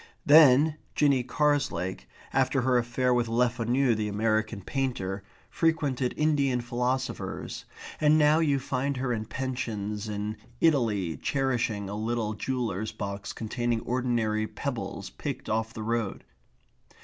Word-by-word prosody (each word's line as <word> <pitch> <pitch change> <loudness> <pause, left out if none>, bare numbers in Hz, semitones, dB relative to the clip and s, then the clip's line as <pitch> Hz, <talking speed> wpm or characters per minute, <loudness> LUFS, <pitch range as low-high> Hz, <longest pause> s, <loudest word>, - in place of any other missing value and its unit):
Then 150 0 +7 0.2
Jinny 140 -4 +3
Carslake, 130 - 0 0.3
after 135 0 +2
her 125 0 +3
affair 125 +1 +1
with 120 -1 +1
Lefanu 120 +2 +2
the 110 -1 -1
American 110 0 0
painter, 100 -7 -2 0.3
frequented 145 -6 0
Indian 140 -5 +2
philosophers, 125 +2 -3 0.3
and 155 0 +5
now 150 +1 +5
you 145 -4 +2
find 135 +1 -2
her 125 -1 -1
in 110 -1 -3
pensions 110 -5 -3
in 105 +1 -3 0.2
Italy 110 - +2
cherishing 120 - -1
a 100 - -5
little 110 0 -1
jeweller's 110 -3 -2
box 100 0 -5
containing 120 +1 -2
ordinary 120 -4 0
pebbles 60 - -5
picked 60 - -5
off 110 +1 0
the 110 -1 -6
road. 115 -2 -2
120 Hz, 125 wpm, -28 LUFS, 110-135 Hz, 0.3 s, Then